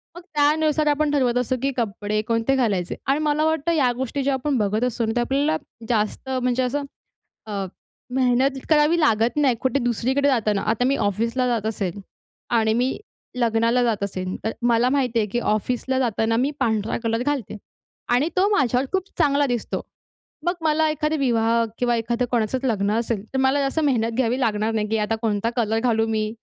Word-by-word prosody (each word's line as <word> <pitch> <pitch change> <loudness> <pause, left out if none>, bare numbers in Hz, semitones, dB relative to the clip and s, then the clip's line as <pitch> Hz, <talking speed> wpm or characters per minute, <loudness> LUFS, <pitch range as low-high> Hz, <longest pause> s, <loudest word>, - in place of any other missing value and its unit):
मग 350 - -9
त्यानुसार 305 -2 +1
आपण 295 0 +2
ठरवत 255 -4 +2
असतो, 250 +1 0
की 275 +1 0
कपडे 215 -2 -1
कोणते 230 +3 +1
घालायचे. 205 -9 0
आणि 275 +2 +2
मला 300 0 +1
वाटतं, 320 +1 +1
या 280 -7 +3
गोष्टी 265 +2 -2
ज्या 275 +1 +1
आपण 265 +1 -1
बघत 210 +1 0
असतो 240 -2 0
ना, 220 - -1
तर - - +3
आपल्याला 275 +5 +1 0.3
जास्त 220 +3 -1
म्हणजे 255 -1 0
असं 280 +3 -1 0.7
अ, 200 -2 -2 0.5
मेहनत 260 +1 +2
करावी 310 +2 +4
लागत 230 -5 +2
नाही 280 -4 +3
कुठे 260 +1 +1
दुसरीकडे 255 +4 +1
जाताना. 215 -6 +1
आता 225 +2 +1
मी 270 +2 +2
ऑफिसला 230 +5 0
जात 230 -4 0
असेल 200 -3 -3 0.6
आणि 220 -1 +2
मी 250 +3 0 0.4
लग्नाला 230 +1 +2
जात 220 -4 0
असेल, 185 -2 -4
तर 220 - -1
मला 240 +1 +3
माहिती 255 -4 +1
आहे, 215 - +1
की 240 +5 -1
ऑफिसला 245 +4 -1
जाताना 225 -2 +1
मी 260 +5 +1
पांढरा 220 -1 0
कलर 230 +1 0
घालते 260 -6 -2 0.6
आणि 270 +6 +2
तो 380 +2 +4
माझ्यावर 255 0 +1
खूप 380 0 -1
चांगला 290 -3 +3
दिसतो. 245 -3 -2 0.7
मग 350 - +2
मला 315 0 +2
एखादा 305 +1 -1
विवाह 230 -3 +2
किंवा 245 -1 +1
एखादं 235 +2 -1
कोणाचंच 245 +2 0
लग्न 205 -5 +1
असेल. 230 -3 -2
तर - - +1
मला 265 +2 +2
जास्त 275 +3 0
मेहनत 235 -5 +1
घ्यावी 250 0 +1
लागणार 220 -2 0
नाही, 210 -1 -1
की 225 - 0
आता 210 +1 0
कोणता 220 0 0
कलर 225 -2 +1
घालू 225 -2 +1
मी? 215 -1 -1
245 Hz, 185 wpm, -23 LUFS, 225-275 Hz, 0.7 s, करावी